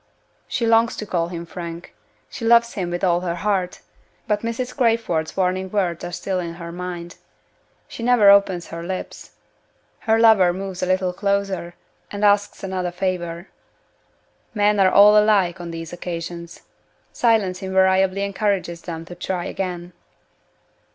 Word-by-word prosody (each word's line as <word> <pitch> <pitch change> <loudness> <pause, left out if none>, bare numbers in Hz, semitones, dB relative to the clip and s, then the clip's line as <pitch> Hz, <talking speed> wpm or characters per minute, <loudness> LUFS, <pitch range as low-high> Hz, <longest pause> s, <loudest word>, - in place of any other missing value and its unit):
She 235 - -1
longs 230 0 +3
to 215 - -5
call 170 -4 -1
him 170 -1 -6
Frank 170 0 -8 0.3
she 235 - -9
loves 235 0 +4
him 180 -3 -3
with 175 +1 -4
all 175 -2 +3
her 175 -2 -2
heart. 185 -1 -2 0.5
But 210 -1 0
Mrs. 230 +2 -4
Crayford's 225 - 0
warning 185 0 0
words 180 -4 -1
are 175 - -5
still 185 +2 -3
in 170 -1 -5
her 170 -1 -8
mind. 175 -1 -7 0.7
She - - -9
never 230 -4 +6
opens 195 -3 +3
her 165 - -6
lips. 185 +2 -6 0.7
Her 220 0 +2
lover 220 -6 +5
moves 190 0 -6
a 185 - -1
little 185 -1 0
closer, 195 -2 -2 0.3
and 205 0 -1
asks 205 0 +2
another 185 -2 -2
favor. 175 -1 -3 1.1
Men 210 0 +2
are 190 -1 +5
all 205 +2 +7
alike 190 -4 +2
on 170 - -6
these 165 0 -7
occasions. 170 -1 -6 0.5
Silence 210 -6 +1
invariably 190 0 +2
encourages 200 -4 -1
them 165 -1 -7
to 175 - -10
try 175 0 -4
again. 180 -2 -5
185 Hz, 150 wpm, -21 LUFS, 175-205 Hz, 1.1 s, all